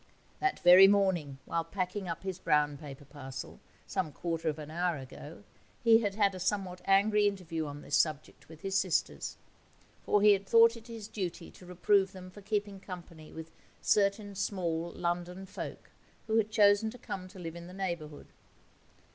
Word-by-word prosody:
That 385 0 0
very 180 +2 +9
morning, 190 -9 +2
while 165 - -1
packing 185 +2 -3
up 175 - -5
his 190 -1 -4
brown 150 -1 +2
paper 140 -1 -10
parcel, 135 -2 -8 0.3
some 160 -5 -2
quarter 165 0 -2
of 150 - -3
an 155 0 -8
hour 175 0 0
ago, 145 +6 -10 0.4
he 225 -1 +7
had 205 -3 -2
had 200 -2 +3
a 185 - -7
somewhat 185 -1 -2
angry 205 +2 +4
interview 165 -6 -3
on 145 0 -8
this 145 - +1
subject 155 -1 -1
with 160 -1 -13
his 195 0 -4
sisters. 185 -3 0 0.7
For 205 -1 +2
he 210 -1 +8
had 195 0 -2
thought 230 +2 +6
it 230 0 -12
his 225 -3 -8
duty 185 -5 -5
to 180 - -15
reprove 190 +2 +2
them 185 -1 -10
for 205 - -12
keeping 205 -1 -2
company 175 -4 -10
with 160 0 -9 0.3
certain 205 0 +1
small 175 -4 -2
London 175 +2 -3
folk 190 - -8 0.3
who 220 0 +1
had 215 -1 +2
chosen 210 0 +4
to 245 - -10
come 185 -5 -6
to 185 - -14
live 165 -2 -6
in 170 0 -9
the - - -10
neighbourhood. 170 -6 -5
185 Hz, 180 wpm, -31 LUFS, 165-205 Hz, 0.7 s, very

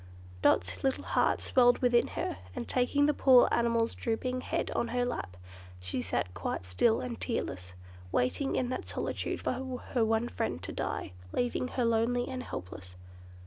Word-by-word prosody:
Dot's 90 +1 +2
little 270 -1 0
heart - - +1
swelled 245 -1 +4
within 245 -1 +3
her, - - -2 0.2
and 120 - -4
taking 270 +3 +2
the 300 - +3
poor 260 -3 +6
animal's 230 -1 +2
drooping 255 +2 -2
head - - -2
on 235 - 0
her 245 +1 0
lap, 95 - -4 0.4
she 90 +7 -3
sat 90 -4 -2
quite 90 +1 -3
still 90 - +2
and 245 -2 -5
tearless; 90 - -3 0.4
waiting 200 - 0
in 250 -1 0
that 255 - -4
solitude - - -3
for - - 0 0.4
her 240 - +3
one 225 +1 +1
friend - - -3
to - - -5
die—leaving 90 - -3
her 250 -1 -1
lonely 230 +2 +1
and 260 -1 -4
helpless. 90 - -8
235 Hz, 160 wpm, -31 LUFS, -, 0.4 s, poor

